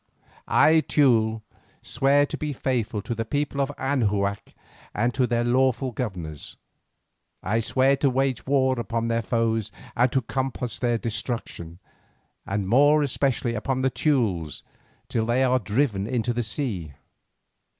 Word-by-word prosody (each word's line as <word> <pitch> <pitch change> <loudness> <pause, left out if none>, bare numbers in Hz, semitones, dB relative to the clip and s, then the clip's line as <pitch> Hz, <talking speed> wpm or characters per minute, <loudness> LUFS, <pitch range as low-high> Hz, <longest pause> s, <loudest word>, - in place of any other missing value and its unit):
I, 160 +1 +5
Teule, 110 -6 +2 0.4
swear 140 +1 +3
to - - -5
be 150 -1 -3
faithful 120 -6 -2
to 120 - -3
the 115 0 -2
people 145 +3 -2
of 140 +1 -1
Anahuac 105 -7 -1 0.4
and 120 +3 +1
to 130 -2 +1
their 120 0 0
lawful 130 +1 +1
governors. 90 - -6 0.9
I 110 +4 0
swear 130 +4 +2
to 140 - +2
wage 130 -1 -1
war 130 -2 +2
upon 115 +1 -2
their 115 0 +1
foes 115 -1 -1 0.2
and 125 +1 +3
to 130 - +1
compass 130 -1 -3
their 120 -2 +1
destruction, 110 -7 -5 0.7
and 100 -1 -2
more 145 +7 +5
especially 130 -3 0
upon 130 +4 -2
the 130 - +2
Teules 105 - 0 0.4
till 110 -1 -1
they 125 +3 +2
are 130 0 +3
driven 105 -1 0
into 120 0 -1
the 120 - -1
sea. 110 - -3
120 Hz, 140 wpm, -25 LUFS, 110-135 Hz, 0.9 s, I